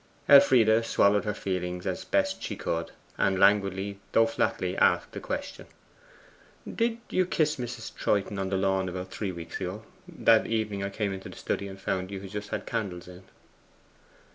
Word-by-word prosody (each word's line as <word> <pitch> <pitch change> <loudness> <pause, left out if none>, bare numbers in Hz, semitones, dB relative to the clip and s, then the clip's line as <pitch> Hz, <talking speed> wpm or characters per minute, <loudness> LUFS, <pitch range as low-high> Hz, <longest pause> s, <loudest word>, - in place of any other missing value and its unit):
Elfride 120 -8 +6
swallowed 105 -2 +3
her 105 - -1
feelings 90 -2 -3
as - - -2
she - - -12
best - - 0
could, 85 0 -2 0.3
and 95 -1 +2
languidly 100 0 +2
though 115 - +6
flatly 115 - -1
asked - - +2
a - - -3
question. - - -5 1.0
'Did 230 0 -1
you 185 - +3
kiss 155 -4 0
Mrs. 120 -2 -6
Troyton 100 -1 0
on 95 -1 -2
the 95 - 0
lawn 95 -1 +1
about 90 +1 -6
three 100 -3 -3
weeks 85 0 -7
ago? 95 +4 -4 0.2
That 115 -1 +3
evening 110 -3 -1
I 100 - -2
came 100 0 -2
into 95 0 -7
the - - -12
study 100 - -3
and 95 0 -9
found 95 -1 -2
you 100 -1 -5
had 95 -1 -9
just 105 0 -5
had - - -4
candles 90 -6 -4
in? 90 +1 -12
100 Hz, 175 wpm, -28 LUFS, 95-110 Hz, 1.0 s, Elfride